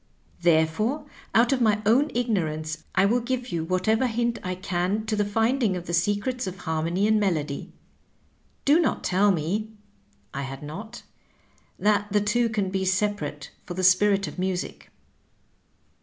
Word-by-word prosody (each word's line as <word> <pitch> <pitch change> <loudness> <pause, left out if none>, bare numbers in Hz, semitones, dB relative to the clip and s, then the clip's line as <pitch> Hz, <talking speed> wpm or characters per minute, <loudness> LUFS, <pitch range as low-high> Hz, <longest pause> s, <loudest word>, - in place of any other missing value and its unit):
Therefore, 175 - +2 0.3
out 235 +4 +5
of 255 - 0
my 215 -2 +3
own 260 +8 +4
ignorance 160 -10 -1
I 190 - +4
will 235 +5 +3
give 250 +1 -3
you 165 -5 -2
whatever 185 +8 +1
hint 235 0 -1
I 185 0 -2
can 185 +3 -1
to 220 -1 -1
the 210 - +1
finding 225 +1 +1
of 175 - -7
the 170 - -5
secrets 205 +7 0
of 185 0 -5
harmony 165 +5 0
and 215 0 +3
melody. 155 -8 -1 0.9
Do 290 +4 +5
not 340 - 0
tell 200 +3 +3
me 190 +6 -1 0.3
" - - -38
(I 140 - -3
had 135 +1 -6
not) 210 +11 -8 0.4
" - - -36 0.3
that 210 0 +1
the 210 - +3
two 230 +3 +1
can 205 -4 -1
be 190 0 -1
separate 185 -6 -1
for 175 - -7
the 185 - -2
Spirit 195 +2 +4
of - - -8
Music.'' 185 -1 -3
200 Hz, 165 wpm, -25 LUFS, 175-225 Hz, 0.9 s, out